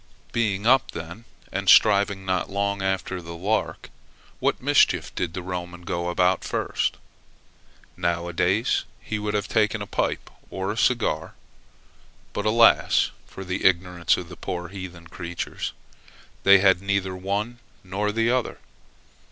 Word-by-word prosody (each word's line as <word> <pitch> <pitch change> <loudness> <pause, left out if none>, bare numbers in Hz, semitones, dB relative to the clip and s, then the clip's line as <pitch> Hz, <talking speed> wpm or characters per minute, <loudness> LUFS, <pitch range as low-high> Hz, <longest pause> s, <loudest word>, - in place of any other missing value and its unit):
Being 105 -3 0
up 130 +2 +4
then, 85 +7 -8 0.3
and 100 0 -1
stirring 100 -2 +5
not 95 -1 -1
long 100 0 -1
after 95 -1 -2
the 85 0 -8
lark, 105 +6 -2 0.5
what - - +1
mischief - - +3
did 85 -1 -3
the 95 - -4
Roman 90 -1 -6
go 85 0 -2
about 90 0 +2
first? - - -1 1.0
Now 85 0 -1
a 85 - -6
days, 95 +7 +1 0.2
he 105 - -4
would 105 0 -2
have 100 -1 -1
taken 110 0 +1
a 100 - -4
pipe - - -2 0.2
or 95 +1 -3
a - - -4
cigar. 115 -10 0 1.0
But, 105 - -2
alas 115 +1 +4 0.2
for 95 - -9
the 90 0 -3
ignorance 90 -2 +2
of 90 -2 -7
the 85 - -9
poor 90 0 -5
heathen 90 -3 -8
creatures! 85 0 -5 0.7
they 100 0 +7
had 95 -1 +4
neither 100 -1 -1
one 100 +6 -3 0.2
nor 100 +3 -2
the 115 +2 +1
other. 125 -2 -1
95 Hz, 145 wpm, -24 LUFS, 90-105 Hz, 1.0 s, they